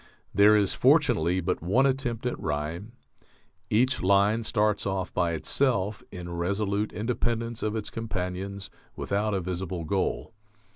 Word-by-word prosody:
There 105 +2 +6
is, 100 -2 +2
fortunately, 85 +4 +3
but 90 +1 -1
one 105 +11 +3
attempt 130 -4 -1
at 125 - -2
rhyme.... 80 - -4 0.8
Each 125 +4 +2
line 100 +4 +3
starts 105 -2 +1
off 95 -1 -2
by 85 -2 +1
itself, 105 - 0
in 90 -2 -7
resolute 100 +4 -1
independence 115 +1 -2
of 110 0 -1
its 105 -2 -4
companions, 100 -2 -4 0.2
without 105 +1 -1
a 95 - -1
visible 90 -1 -4
goal 95 +6 -2
100 Hz, 135 wpm, -27 LUFS, 90-110 Hz, 0.8 s, There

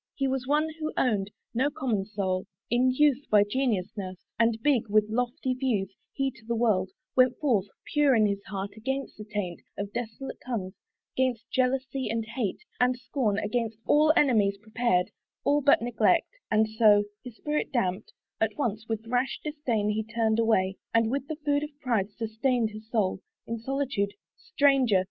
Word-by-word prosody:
He 275 - 0
was 260 -1 -2
one 300 +2 +2
who 310 0 -2
own'd 205 -6 +1 0.2
No 260 +5 +2
common 255 -10 -1
soul. 190 -3 -2 0.2
In 250 +2 +4
youth, 285 +1 +3
by 210 -1 +6
genius 210 -5 0
nurs'd, 185 -3 -7
And 230 -1 +3
big 255 -7 +2
with 210 0 +4
lofty 245 +3 -1
views, 225 -7 -1 0.2
he 270 -1 -1
to 235 -3 -19
the 235 - 0
world 210 -5 +2 0.3
Went 255 -1 +4
forth, 230 -10 +1 0.3
pure 290 -3 +4
in 215 -2 +4
his 200 -1 0
heart, 195 0 -4
against 265 +5 -4
the - - -5
taint 205 -5 -4 0.2
Of 200 0 -4
dissolute 240 +3 -5
tongues, 205 -7 -3 0.4
'gainst 245 -3 -1
jealousy, 260 -1 0
and 225 0 -1
hate, 230 - -3 0.2
And 250 0 +3
scorn, 245 -4 -1
against 225 +1 -1
all 305 +1 +5
enemies 210 -8 +3
prepared, 215 -3 0 0.3
All 290 +1 +3
but 280 -4 +4
neglect: 240 0 +2 0.2
and 215 0 +3
so, 215 -2 +5 0.2
his 250 -3 -9
spirit 300 +5 -2
damped 200 -5 -1 0.3
At 220 -1 0
once, 220 -5 -2
with 225 0 -2
rash 245 +3 0
disdain 255 -9 -1
he 220 +1 -1
turned 220 0 0
away, 195 -4 +2 0.2
And 230 0 +3
with 275 +1 -2
the 315 - -3
food 285 0 +2
of 295 -1 -7
pride 230 -8 0
sustained 225 +2 0
his 215 +1 -11
soul 200 -5 0 0.2
In 230 0 -4
solitude. 250 -5 -1 0.2
Stranger! 275 - +3
230 Hz, 170 wpm, -28 LUFS, 210-265 Hz, 0.4 s, by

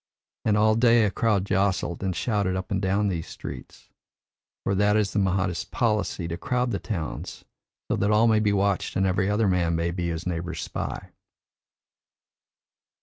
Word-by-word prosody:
And 105 -1 +3
all 110 +1 +4
day 115 0 +5
a 100 - 0
crowd 105 -4 +1
jostled 95 -3 0
and 95 -2 -1
shouted 100 -1 0
up 95 0 -5
and 95 -1 0
down 100 +2 +1
these 85 -4 -2
streets - - -9 0.7
for 100 - 0
that 105 +2 +3
is 105 -2 0
the 105 - +1
Mahdist 95 -2 0
policy 105 -6 0
to 85 0 -4
crowd 125 +2 -1
the 100 - -1
towns 85 -9 -5 0.4
so - - 0
that 100 - +1
all 105 +2 +4
may 110 -1 +4
be 105 -1 +2
watched 100 -1 0
and 95 - +2
every 95 +1 +1
other 105 +1 +2
man 85 -3 +1
may 85 +1 0
be 85 0 -2
his 85 0 -4
neighbour's 85 -2 -3
spy. - - -5
100 Hz, 175 wpm, -25 LUFS, 90-105 Hz, 0.7 s, day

